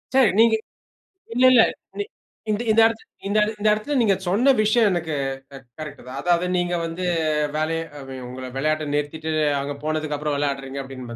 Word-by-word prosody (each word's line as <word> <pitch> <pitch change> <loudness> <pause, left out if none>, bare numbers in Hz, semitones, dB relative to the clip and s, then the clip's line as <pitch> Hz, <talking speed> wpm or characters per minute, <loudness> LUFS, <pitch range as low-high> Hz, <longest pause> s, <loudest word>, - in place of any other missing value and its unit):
சரி, 265 -5 +6
நீங்க 225 0 +6 0.8
இல்ல, 250 +1 +4
இல்ல. 240 - +8 0.4
நீ 410 - 0 0.5
இந்த 210 +1 0
இந்த 225 +1 +5
இடத்தில 225 0 -1 0.2
இந்த 205 +2 0
இட 210 - 0
இந்த 210 - +1
இடத்தில 215 +8 -2
நீங்க 205 -4 +3
சொன்ன 235 +10 +4
விஷயம் 215 +1 +4
எனக்கு 165 -4 -2 0.4
க - - -10 0.2
கரெக்ட்டு 150 -4 -8
தான். 130 +2 -6
அதாவது, 175 0 +2
நீங்க 175 0 0
வந்து 165 +2 -4 0.5
வேலைய 165 +1 0 0.2
அ - - -8
வெ 135 - -6
உங்கள 130 +1 -7
விளையாட்டை 155 +2 0
நிறுத்திட்டு, 155 +2 -2 0.3
அவங்க 140 +1 -3
போனதுக்குப்புறம் 155 -1 -2
விளைடுறீங்க 140 -1 -2
அப்படின்னு. 130 -3 -8
160 Hz, 170 wpm, -23 LUFS, 145-215 Hz, 0.8 s, இல்ல